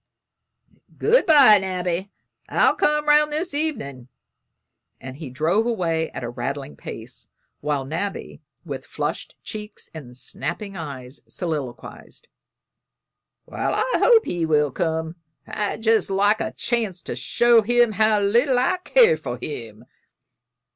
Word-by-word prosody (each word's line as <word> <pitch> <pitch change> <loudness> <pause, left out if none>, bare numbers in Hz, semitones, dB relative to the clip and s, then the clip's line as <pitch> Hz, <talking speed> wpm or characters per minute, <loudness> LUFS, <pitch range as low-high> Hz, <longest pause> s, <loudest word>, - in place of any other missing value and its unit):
"Good 460 0 +3
bye, 275 -10 +8
Nabby, 185 0 -3 0.4
I'll - - +3
come 300 0 +1
'round 300 0 +5
this 315 +2 -1
evenin'," 180 - -3 0.9
and 130 0 -9
he 155 -3 -7
drove 165 - +1
away 165 -8 -1
at - - -7
a 120 - -3
rattling 125 - -5
pace, - - -7 0.3
while 145 -2 -2
Nabby, 165 +8 -5 0.2
with - - -6
flushed - - -4
cheeks 210 -1 -8
and 125 -6 -10
snapping 170 +10 -4
eyes, 140 -5 -7
soliloquized: 155 - -6 1.2
"Well, - - -2
I - - 0
hope 460 -2 +5
he 175 -1 -2
will 150 -3 +2
come! 160 +2 -2 0.3
I'd 210 +1 -3
jest 225 -2 +3
like 205 +3 +2
a - - -3
chance 220 -7 -2
to - - -5
show 235 - +4
him 240 +1 +3
how 215 0 +3
little 240 +6 +3
I 255 +8 +2
care 475 +5 +4
for - - -5
him." 115 -5 -7
190 Hz, 130 wpm, -23 LUFS, 150-240 Hz, 1.2 s, bye